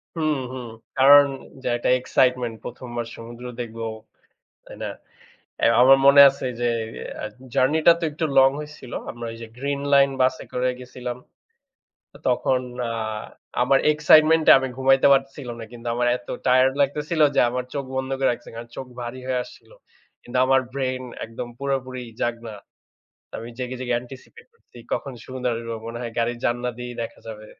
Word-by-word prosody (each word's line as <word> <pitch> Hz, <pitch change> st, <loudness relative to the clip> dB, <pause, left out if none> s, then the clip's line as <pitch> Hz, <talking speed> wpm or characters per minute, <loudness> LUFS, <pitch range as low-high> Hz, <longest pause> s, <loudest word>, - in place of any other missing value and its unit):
হুম, 155 Hz, -3 st, 0 dB, 0.2 s
হুম। 125 Hz, -2 st, -6 dB, 0.3 s
কারণ 140 Hz, +2 st, +8 dB, 0.4 s
যা 125 Hz, -, 0 dB, 0.3 s
এক্সাইটমেন্ট 125 Hz, -2 st, +1 dB
১ম 125 Hz, +1 st, -8 dB
বার 120 Hz, -1 st, -2 dB
সমুদ্র 120 Hz, +2 st, -10 dB, 0.2 s
দেখবো, 115 Hz, -1 st, -6 dB, 0.8 s
তাই -, -, -12 dB
না? -, -, -3 dB, 0.8 s
এ -, -, +6 dB, 0.2 s
আমার 135 Hz, +1 st, +8 dB
মনে 140 Hz, 0 st, +8 dB
আছে 135 Hz, -1 st, -4 dB
যে, 120 Hz, -, +1 dB, 0.6 s
আ -, -, -4 dB, 0.3 s
জার্নিটা 155 Hz, +5 st, +5 dB
তো 170 Hz, -, -2 dB
একটু 155 Hz, +2 st, -3 dB
লং 135 Hz, 0 st, +7 dB
হইছিল। 150 Hz, -5 st, -10 dB, 0.2 s
আমরা 120 Hz, 0 st, -7 dB
এই 115 Hz, -, -10 dB
যে -, -, -6 dB
গ্রীন 140 Hz, +1 st, -2 dB
লাইন 140 Hz, 0 st, +6 dB
বাসে 130 Hz, 0 st, +1 dB
করে 125 Hz, 0 st, 0 dB
গেছিলাম। 125 Hz, -1 st, -7 dB, 0.9 s
তো -, -, -15 dB
তখন 125 Hz, +1 st, +1 dB, 0.3 s
আ -, -, -3 dB, 0.7 s
আমার 135 Hz, +2 st, +4 dB
এক্সাইটমেন্ট 155 Hz, +1 st, +5 dB
এ -, -, +12 dB
আমি 135 Hz, -, -2 dB
ঘুমাইতে 135 Hz, +1 st, +4 dB
পারতেছিলাম 135 Hz, -2 st, -2 dB
না। 115 Hz, -, -6 dB
কিন্তু 120 Hz, 0 st, -9 dB
আমার 120 Hz, 0 st, +1 dB
এত 125 Hz, -, -21 dB, 0.2 s
টায়ার্ড 130 Hz, +1 st, +4 dB
লাগতেছিল 150 Hz, +3 st, 0 dB
যে -, -, +4 dB
আমার 125 Hz, +1 st, -2 dB
চোখ 140 Hz, -, -2 dB
বন্ধ 130 Hz, 0 st, -2 dB
করে 135 Hz, -, +3 dB
রাখসি। -, -, -7 dB
কারণ 115 Hz, 0 st, -8 dB
চোখ 130 Hz, -, -6 dB
ভারী 120 Hz, +2 st, -6 dB
হয়ে 125 Hz, -1 st, 0 dB
আসছিল। -, -, -16 dB, 0.5 s
কিন্তু 125 Hz, +1 st, -5 dB
আমার 135 Hz, 0 st, +4 dB
ব্রেইন 130 Hz, -2 st, -2 dB, 0.2 s
একদম 115 Hz, +2 st, -7 dB
পুরোপুরি 130 Hz, -2 st, -3 dB, 0.2 s
জাগনা। 115 Hz, -1 st, -3 dB, 0.8 s
আমি 115 Hz, -, -7 dB
জেগে, 125 Hz, 0 st, -4 dB
জেগে 125 Hz, -1 st, -1 dB
এন্টিসিপেট 135 Hz, -, -13 dB
করছি 460 Hz, -, -24 dB, 0.2 s
কখন 135 Hz, -, -2 dB
সমুদ্র 130 Hz, -1 st, -4 dB
আসবো। 115 Hz, 0 st, -5 dB
মনে 115 Hz, 0 st, -6 dB
হয় 115 Hz, -2 st, -5 dB
গাড়ির 120 Hz, +1 st, 0 dB
জানলা 120 Hz, +1 st, 0 dB
দিয়েই 125 Hz, 0 st, -6 dB
দেখা -, -, -8 dB
যাবে। 110 Hz, -1 st, -8 dB
130 Hz, 165 wpm, -23 LUFS, 120-135 Hz, 0.9 s, এ